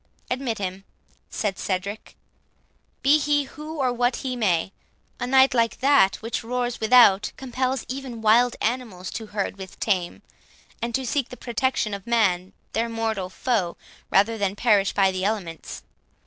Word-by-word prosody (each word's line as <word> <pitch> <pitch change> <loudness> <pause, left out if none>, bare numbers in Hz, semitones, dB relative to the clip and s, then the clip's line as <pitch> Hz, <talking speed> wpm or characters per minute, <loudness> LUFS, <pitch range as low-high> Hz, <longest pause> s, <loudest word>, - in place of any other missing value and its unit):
"Admit 250 -3 -1
him," 190 0 -4 0.5
said 200 -3 -2
Cedric, 200 +3 -4 0.9
"be 290 +3 +5
he 290 0 +2
who 305 +3 -9
or 255 -3 +1
what 245 +1 +1
he 260 -2 -3
may;—a 195 +3 -3
night 265 0 +5
like 230 -2 +1
that 270 -8 +4
which 230 +1 -3
roars 245 +1 -2
without, 220 -3 +5
compels 260 0 -2
even 260 -3 -6
wild 235 +3 +4
animals 220 -6 -2
to 220 - -6
herd 200 -1 -3
with 190 -1 -10
tame, 185 -5 -1 0.6
and 235 0 -2
to 265 - -1
seek 265 +1 -1
the 250 - -9
protection 240 -2 -1
of 200 +1 -7
man, 190 -6 +2 0.2
their 230 +1 0
mortal 220 -5 -2
foe, 190 -4 -1 0.3
rather 220 +3 +3
than 200 -1 0
perish 205 -3 +3
by 195 -1 +3
the 185 0 -3
elements. 195 -6 -3
230 Hz, 150 wpm, -24 LUFS, 195-250 Hz, 0.9 s, be